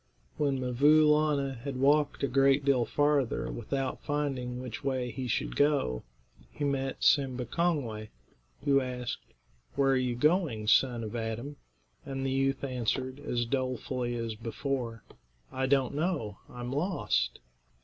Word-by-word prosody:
When 140 -3 +1
'Mvoo 145 +5 +4
Laana 150 -4 +2
had 135 +1 -5
walked 145 +3 +2
a - - +3
great 135 +2 +3
deal 130 -4 +3
farther 145 -1 +1
without 130 +3 -3
finding 135 -4 -2
which 125 -3 -6
way 130 -3 -1
he 125 +3 -4
should 120 - -1
go, 145 - +2 0.5
he 150 - -6
met 135 -1 -1
Simba 130 -3 +3
Kongway, 125 -9 -1 0.6
who 135 -1 +4
asked, 125 -1 -4 0.6
"Where 135 -1 +3
are - - +4
you 125 -2 0
going, 150 - +1
son 120 0 +4
of 110 +1 -5
Adam?" 120 +5 -4 0.5
And 135 -1 -4
the 135 - 0
youth 135 +1 0
answered, 130 +1 -2
as 120 -4 -1
dolefully 125 -1 -2
as 115 -1 -3
before, 115 0 -4 0.5
"I 130 0 -1
don't 135 -1 +2
know; 145 - -2
I'm 120 +1 -6
lost." 135 - 0
130 Hz, 140 wpm, -30 LUFS, 120-140 Hz, 0.6 s, Mvoo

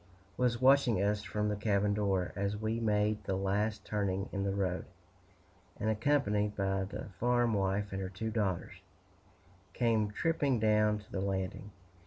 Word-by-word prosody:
W - - 0
was 120 -1 +1
watching 130 -5 +5
us 100 +1 +1
from 105 0 -2
the 105 - 0
cabin 100 0 +1
door, 95 -3 0
as 100 +1 -1
we 110 +2 -1
made 105 -1 +1
the 95 - -1
last 100 +3 -1
turning 100 -2 -1
in 100 - -2
the 100 0 -1
road, 95 -2 -1 0.9
and, 110 +1 +1
accompanied 105 -4 +1
by 95 -1 0
the 95 - -7
farm 120 -1 +2
wife 100 0 0
and 95 - -3
her 95 - -3
two 110 +4 -4
daughters, 100 -5 -1 1.0
came 110 -3 +2
tripping 145 +2 +1
down 105 -1 +3
to 105 0 -14
the 95 - -2
landing. 95 +1 -3
105 Hz, 165 wpm, -32 LUFS, 100-110 Hz, 1.0 s, watching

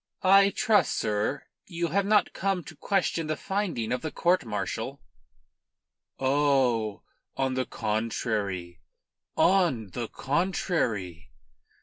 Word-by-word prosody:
"I 195 +1 +6
trust, 215 0 +2
sir, 105 +7 -1 0.2
you 170 -2 -2
have 195 +4 +1
not 210 -1 +3
come 195 -2 -1
to 160 - -11
question 170 -1 0
the 155 -1 -2
finding 190 - -2
of 125 - -1
the 160 - -3
court 175 +2 +2
martial." 105 -5 -4 1.2
"Oh, 130 -6 +1 0.3
on 135 -1 0
the 130 0 -1
contrary 105 -5 -2 0.6
on 170 - +3
the 120 +2 -4
contrary!" 125 - -1
135 Hz, 110 wpm, -27 LUFS, 110-180 Hz, 1.2 s, I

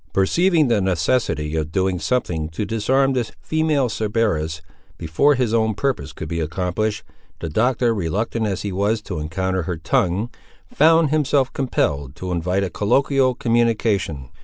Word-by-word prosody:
Perceiving 165 - +3
the 115 -4 +2
necessity 80 -4 0
of 80 0 -2
doing 95 0 0
something 80 -4 -1
to 85 +7 -4
disarm 130 +6 +1
this 120 -4 -2
female 155 -4 +1
Cerberus, 100 -9 -1 0.3
before 85 - +2
his 125 -4 0
own 110 -2 +2
purpose 105 - -2
could 80 - -7
be 85 +1 -3
accomplished, 95 +7 -2 0.3
the 85 - -5
Doctor, 120 +6 +1
reluctant 105 +4 -1
as 95 -2 -3
he 100 - -3
was 100 +4 0
to - - -5
encounter 95 +4 -2
her 85 0 -4
tongue, 90 +7 0 0.4
found 160 0 +4
himself 140 -3 +1
compelled 70 - -1
to 90 -1 -5
invite 90 +3 0
a 95 - -3
colloquial 130 - +2
communication. 110 - 0
105 Hz, 150 wpm, -21 LUFS, 85-125 Hz, 0.4 s, found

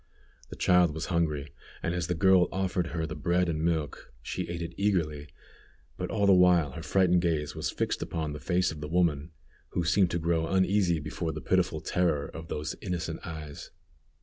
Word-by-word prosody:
The - - -8
child 90 -4 +3
was 80 - -3
hungry, 75 -4 -1 0.3
and 85 - 0
as 90 -2 -2
the 90 - -1
girl 95 0 +4
offered 95 -2 -1
her 80 -1 -3
the 80 - -5
bread 90 +3 +1
and 80 -1 -1
milk, 80 -3 -2
she - - -4
ate 85 0 -3
it 85 0 -6
eagerly, 80 -8 0 0.7
but - - -4
all 100 -2 +1
the 100 - +6
while 90 -5 +5
her 80 - -7
frightened 90 +2 +3
gaze 75 -5 -1
was - - -2
fixed - - -2
upon 80 -2 -3
the 75 - -6
face 90 +5 +1
of 75 -2 -8
the 75 - -4
woman, 80 -3 +1 0.4
who 90 - 0
seemed 90 +2 +3
to 85 - -1
grow 80 -1 0
uneasy 95 -2 +2
before 80 +2 -4
the 80 - -5
pitiful - - 0
terror 85 -5 0
of 80 0 -9
those 75 -1 -4
innocent 85 -4 -3
eyes. 75 -3 -7
85 Hz, 195 wpm, -29 LUFS, 80-90 Hz, 0.7 s, the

